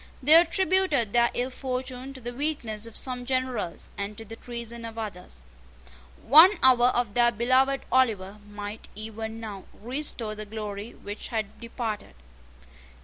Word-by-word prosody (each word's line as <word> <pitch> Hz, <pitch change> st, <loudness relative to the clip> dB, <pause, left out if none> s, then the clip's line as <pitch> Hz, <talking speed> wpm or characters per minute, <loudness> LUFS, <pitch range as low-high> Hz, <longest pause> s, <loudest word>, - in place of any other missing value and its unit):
They 295 Hz, +4 st, +6 dB
attributed 340 Hz, -, +4 dB
their 235 Hz, 0 st, +4 dB
ill 250 Hz, +2 st, -1 dB
fortune 255 Hz, 0 st, -4 dB
to -, -, -8 dB
the 240 Hz, 0 st, -6 dB
weakness 240 Hz, -6 st, -2 dB
of 230 Hz, -, -11 dB
some 250 Hz, -1 st, -2 dB
generals, 255 Hz, -8 st, -2 dB
and 200 Hz, +1 st, -4 dB
to 225 Hz, -, -8 dB
the 225 Hz, +2 st, -9 dB
treason 235 Hz, 0 st, -7 dB
of 230 Hz, 0 st, -8 dB
others. 185 Hz, -, -7 dB, 0.8 s
One 325 Hz, -, +8 dB
hour 250 Hz, -2 st, +6 dB
of 245 Hz, -4 st, 0 dB
their 240 Hz, +1 st, +4 dB
beloved 260 Hz, +4 st, +2 dB
Oliver 210 Hz, -6 st, +1 dB
might 205 Hz, +1 st, -7 dB
even 220 Hz, +1 st, -6 dB
now 210 Hz, -4 st, -7 dB
restore 240 Hz, -2 st, -3 dB
the 215 Hz, 0 st, -7 dB
glory 210 Hz, 0 st, -6 dB
which 205 Hz, +1 st, -7 dB
had 220 Hz, -4 st, -4 dB
departed. 230 Hz, -2 st, -5 dB
235 Hz, 145 wpm, -27 LUFS, 215-260 Hz, 0.8 s, One